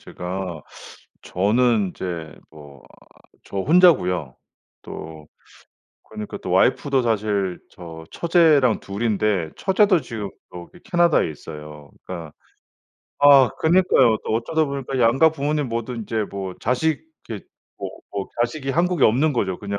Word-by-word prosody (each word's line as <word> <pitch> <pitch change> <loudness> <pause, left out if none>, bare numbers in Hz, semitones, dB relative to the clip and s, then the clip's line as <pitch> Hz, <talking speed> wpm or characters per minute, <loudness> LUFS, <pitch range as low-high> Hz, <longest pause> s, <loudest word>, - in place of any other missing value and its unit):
제가 90 -3 -6 0.6
저는 105 +1 +1
이제 85 -4 -6 0.2
뭐 70 -4 -14 0.7
저 100 - -6
혼자고요. 95 - +3 0.5
또 80 -2 -9 0.8
그러니까 105 -1 -7
또 - - -7
와이프도 130 +8 +2
사실 105 -5 -1
저 80 -4 -11
처제랑 160 - +3
2 100 +4 -6
인데 105 -6 0
처제도 190 -3 +3
지금 105 -5 -6 0.2
저기 90 - -11
캐나다에 170 - +2
있어요. 75 -1 -10
그러니까 85 -4 -7 0.9
아 140 -3 +7
그니까요. 160 -9 +4
또 110 - 0
어쩌다 155 +8 0
보니까 135 -2 -4
양가 130 +7 +4
부모님 150 -1 -2
모두 115 +2 -4
이제 110 -1 -3
뭐 95 -2 -5
자식 135 +6 0 0.3
이렇게 105 -4 -7 0.3
뭐 - - -4 0.2
뭐 100 -1 -4
자식이 135 +3 -1
한국에 170 +1 +1
없는 135 +8 +3
거죠 95 -8 -1
그냥. 100 -1 -4
110 Hz, 270 characters per minute, -22 LUFS, 90-140 Hz, 0.9 s, 아